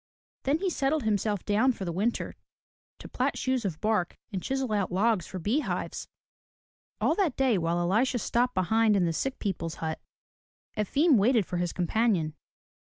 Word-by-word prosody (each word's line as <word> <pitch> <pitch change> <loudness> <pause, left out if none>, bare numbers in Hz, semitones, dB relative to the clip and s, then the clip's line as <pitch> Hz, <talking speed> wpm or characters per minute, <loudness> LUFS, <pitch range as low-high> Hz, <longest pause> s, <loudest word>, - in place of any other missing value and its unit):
Then 280 +3 +3
he 375 +2 -1
settled 290 0 0
himself 210 -2 0
down 220 +6 +3
for 195 - -6
the 170 - -2
winter 205 +7 -1 0.6
to - - -10
plat - - -1
shoes 260 -3 -1
of 165 -5 -3
bark 210 -5 0
and 190 -3 -3
chisel 265 0 -2
out 200 -3 0
logs 200 0 +1
for 190 - -6
bee 210 - +1
hives. - - -3 0.9
All - - +2
that 370 -10 0
day 265 -4 +3
while 165 +1 0
Elisha 215 +9 +2
stopped 245 +2 0
behind 220 +3 +3
in 185 -3 +3
the 165 - 0
sick 270 +10 -2
people's 165 -5 -3
hut, 160 -1 -4 0.7
Efim 275 - +3
waited 220 0 +3
for 180 - -4
his 175 -1 -1
companion. 180 -3 +1
215 Hz, 175 wpm, -28 LUFS, 180-255 Hz, 0.9 s, Then